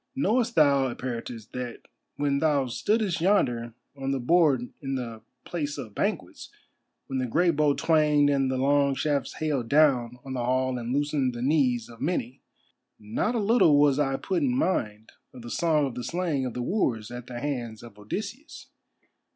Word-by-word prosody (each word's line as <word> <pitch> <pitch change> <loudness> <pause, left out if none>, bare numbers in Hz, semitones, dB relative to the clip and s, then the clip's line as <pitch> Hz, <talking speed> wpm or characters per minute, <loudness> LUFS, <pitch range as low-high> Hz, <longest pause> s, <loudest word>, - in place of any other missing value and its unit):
Knowest 250 -3 +1
thou, 140 -3 +4
Eperitus, 120 -3 -6
that 125 -2 -6 0.3
when 140 -1 0
thou 145 -3 +2
stoodest 200 - 0
yonder 120 - +1 0.2
on 135 -1 -4
the 135 -1 0
board 135 -3 +3
in 135 -1 -3
the 115 -3 -5 0.2
Place 150 -4 -3
of 110 -4 -7
Banquets, - - -3 0.6
when 135 -1 -3
the 130 - -1
great 170 +6 +2
bow 145 -1 +3
twanged 150 -3 +3
and 135 -2 +2
the 130 - -1
long 140 +1 +2
shafts 140 -2 -1
hailed 140 -7 -2
down 130 -5 +3
on 135 - -5
the 125 -2 -2
hall 130 0 0
and 120 0 -4
loosened 140 -2 0
the 120 - -4
knees 130 -5 +2
of 115 -1 -14
many, 130 -7 -2 0.6
not 110 - -2
a - - +1
little 200 -9 +4
was 145 -1 +4
I 135 -2 +1
put 360 - -1
in 255 -3 +1
mind 110 - -1 0.2
of 125 - -11
the 120 - -8
song 155 -4 +2
of 135 - -4
the 125 - -5
slaying 160 -3 -1
of 125 - -7
the 125 - -2
wooers 120 - -1
at 120 0 -8
the 120 -1 -6
hands 120 -5 -4
of 110 -3 -13
Odysseus. 210 - -7
135 Hz, 180 wpm, -26 LUFS, 120-155 Hz, 0.6 s, thou